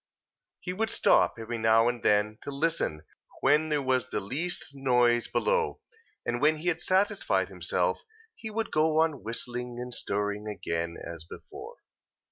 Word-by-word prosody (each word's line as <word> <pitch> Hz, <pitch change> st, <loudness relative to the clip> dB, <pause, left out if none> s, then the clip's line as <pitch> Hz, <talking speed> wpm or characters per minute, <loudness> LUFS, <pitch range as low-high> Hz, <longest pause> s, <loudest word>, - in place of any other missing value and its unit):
He 180 Hz, -, -4 dB
would 220 Hz, +4 st, -1 dB
stop -, -, +4 dB
every 115 Hz, +1 st, -4 dB
now 110 Hz, +1 st, +4 dB
and 120 Hz, -1 st, -1 dB
then 105 Hz, +1 st, +2 dB
to -, -, -7 dB
listen 140 Hz, -, -1 dB, 0.4 s
when 150 Hz, +3 st, +3 dB
there 150 Hz, -2 st, +1 dB
was 130 Hz, -1 st, +1 dB
the -, -, -1 dB
least 165 Hz, -, -3 dB
noise 125 Hz, -3 st, +3 dB
below: 485 Hz, -3 st, 0 dB, 0.5 s
and 120 Hz, +1 st, -1 dB
when 155 Hz, +2 st, +5 dB
he 170 Hz, +3 st, 0 dB
had 165 Hz, 0 st, -1 dB
satisfied 190 Hz, +2 st, +2 dB
himself, -, -, -1 dB, 0.3 s
he 220 Hz, -, -7 dB
would 220 Hz, 0 st, -3 dB
go 155 Hz, 0 st, +3 dB
on 160 Hz, -4 st, +1 dB
whistling 120 Hz, +2 st, -5 dB
and 125 Hz, 0 st, -4 dB
stirring 105 Hz, 0 st, -2 dB
again, 85 Hz, -5 st, -3 dB
as 85 Hz, -1 st, -8 dB
before. 415 Hz, -, -10 dB
130 Hz, 155 wpm, -28 LUFS, 110-165 Hz, 0.5 s, when